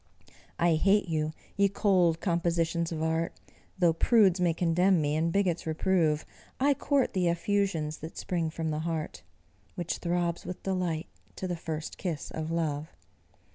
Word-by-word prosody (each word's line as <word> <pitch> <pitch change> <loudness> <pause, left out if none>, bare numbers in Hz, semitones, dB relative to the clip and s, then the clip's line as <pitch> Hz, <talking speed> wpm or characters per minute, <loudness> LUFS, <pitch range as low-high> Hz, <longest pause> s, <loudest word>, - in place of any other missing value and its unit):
I 170 0 +3
hate 195 +4 +3
you, 155 -2 -1 0.2
ye 200 0 +3
cold 180 -5 +2
compositions 170 -1 0
of 160 -1 -2
art; 160 +1 -1 0.4
Though 175 -3 +4
prudes 190 0 +4
may 175 -1 +4
condemn 175 +2 +3
me, 150 -1 0
and 165 +2 +1
bigots 180 -4 0
reprove, 160 -2 +1 0.3
I 280 +2 +4
court 280 0 +1
the 180 -2 +1
effusions 170 -4 0
that 160 +2 -9
spring 170 -4 -1
from 160 0 -3
the 150 - -2
heart 160 -1 -3 0.5
Which 175 -1 -3
throbs 175 -1 -1
with 180 - -7
delight 180 -4 -1 0.3
to 185 - -4
the 175 - -2
first 160 -1 -5
kiss 165 -6 -4
of 160 0 -4
love. 160 -2 -1
170 Hz, 155 wpm, -29 LUFS, 160-185 Hz, 0.5 s, Though